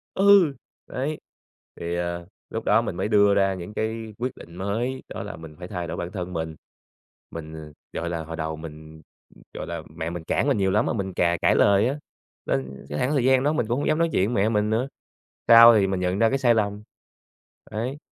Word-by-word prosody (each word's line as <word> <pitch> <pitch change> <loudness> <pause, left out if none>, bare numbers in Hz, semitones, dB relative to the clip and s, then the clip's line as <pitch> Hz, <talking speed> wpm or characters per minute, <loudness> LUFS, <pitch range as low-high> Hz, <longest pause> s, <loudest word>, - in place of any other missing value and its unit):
Ừ, 195 -7 +6 0.3
đấy. 145 +4 -3 0.6
Thì, 85 0 -4
ờ, 85 0 -3 0.2
lúc - - -5
đó - - +4
mình - - -4
mới 95 +3 -1
đưa 105 -1 +5
ra 95 -1 +3
những 95 +3 -7
cái 110 0 -3
quyết 125 +2 -2
định 85 - -13
mới, 115 +8 -2
đó - - -5
là - - -7
mình 80 -1 -11
phải 90 - -7
thay 90 -3 -4
đổi - - -5
bản 85 +1 -4
thân 90 -2 -5
mình. 80 -1 -4 0.8
Mình 80 -2 -8 0.2
gọi 85 - -3
là, 85 -2 -3
hồi 80 +1 -7
đầu 80 -1 -3
mình 80 0 -10 0.5
gọi - - -6
là, 85 -1 -4
mẹ 80 0 -3
mình 85 -1 -6
cản - - 0
mình - - +2
nhiều 95 -1 +2
lắm 105 +4 +2
mà - - 0
mình 95 -4 -3
cà 85 -1 +2
cãi - - +4
lời 100 +3 +4
á, 140 - -2 0.5
nên 65 0 -3
cái 75 - -3
khoảng 130 - +1
thời 135 -5 +2
gian 130 0 +4
đó 150 +2 +2
mình 120 - 0
cũng 120 +4 0
hông - - -1
dám 155 +1 +2
nói 165 - +2
chuyện 100 +6 +1
với 100 - +2
mẹ 110 - +2
mình 105 -1 +1
nữa. 115 +5 0 0.6
Sau 115 0 +10
thì 100 -2 +3
mình 95 -1 -1
nhận 90 +1 -1
ra 115 - +4
cái 135 - +1
sai 120 -3 +4
lầm. 105 -1 -1 0.9
Đấy, 125 +6 -3
100 Hz, 230 wpm, -24 LUFS, 85-115 Hz, 0.9 s, Sau